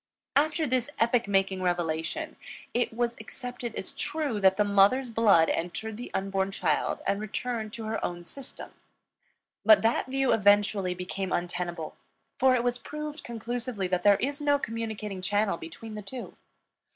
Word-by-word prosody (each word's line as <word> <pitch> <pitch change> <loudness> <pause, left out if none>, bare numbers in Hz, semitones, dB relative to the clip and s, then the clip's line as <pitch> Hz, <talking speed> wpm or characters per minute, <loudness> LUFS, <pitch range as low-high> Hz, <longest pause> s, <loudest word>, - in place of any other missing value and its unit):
After 310 +2 +3
this 255 -1 0
epoch 235 -1 +3
making 195 -1 +1
revelation, 175 - -1 0.4
it 245 +1 +1
was 235 +1 0
accepted 245 +1 -6
as - - -5
true 295 -7 -1
that 190 -1 +5
the 210 - +4
mother's 205 +6 +4
blood 205 -8 +5
entered 210 +6 -3
the 240 +3 -7
unborn 195 0 0
child - - 0
and 200 +1 0
returned 220 +1 -3
to 230 - -6
her 220 0 -3
own 175 0 -3
system. 275 +8 -8 0.9
But 320 -6 +7
that 225 +3 +2
view 270 0 +2
eventually 205 -3 +3
became 185 +1 -4
untenable, 175 -2 -3 0.4
for 260 0 +5
it 240 - +1
was 245 0 0
proved 300 0 -6
conclusively 235 -2 -3
that 180 -1 +1
there 200 +1 +6
is 285 +5 -2
no 290 -1 +4
communicating 220 -5 -4
channel 205 -1 +1
between 190 +8 -9
the 210 - -5
two. 240 +5 -8
220 Hz, 155 wpm, -28 LUFS, 195-250 Hz, 0.9 s, But